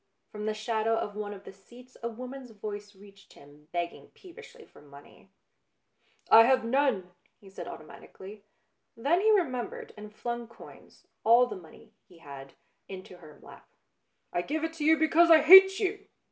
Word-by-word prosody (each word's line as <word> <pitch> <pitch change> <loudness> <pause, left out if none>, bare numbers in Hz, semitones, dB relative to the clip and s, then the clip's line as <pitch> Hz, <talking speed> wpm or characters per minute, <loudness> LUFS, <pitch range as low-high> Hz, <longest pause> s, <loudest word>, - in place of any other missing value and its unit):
From 210 0 -7
the 215 - -2
shadow 220 +1 -1
of 205 -2 -5
one 210 -1 -6
of 195 -1 -11
the - - -12
seats 240 +6 -19
a 235 - -4
woman's 255 +2 -10
voice 205 -1 -9
reached 200 0 -19
him, 145 +1 -19
begging 175 -1 -5
peevishly 430 +5 -15
for - - -20
money. 145 +5 -18 0.5
" - - -49 0.3
I 225 - +9
have 260 -1 +2
none," 230 -8 0 0.3
he 195 -2 -17
said - - -9
automatically. 200 +2 -12 0.5
Then 300 +10 +1
he 435 - +2
remembered 280 - -1
and 210 0 -11
flung 235 +2 -6
coins, 230 - -17 0.2
all 235 +3 +5
the 225 -4 -8
money 185 +5 -16
he 175 - -20
had, 140 -4 -12 0.4
into 185 -1 -11
her 155 -4 -16
lap. - - -16 0.3
" - - -50
I 175 - 0
give 305 - -4
it 325 0 -3
to 305 - -5
you 320 +1 +4
because 320 +2 +3
I 320 -2 +6
hate 385 +2 +8
you 405 0 -3
225 Hz, 175 wpm, -28 LUFS, 195-280 Hz, 0.5 s, I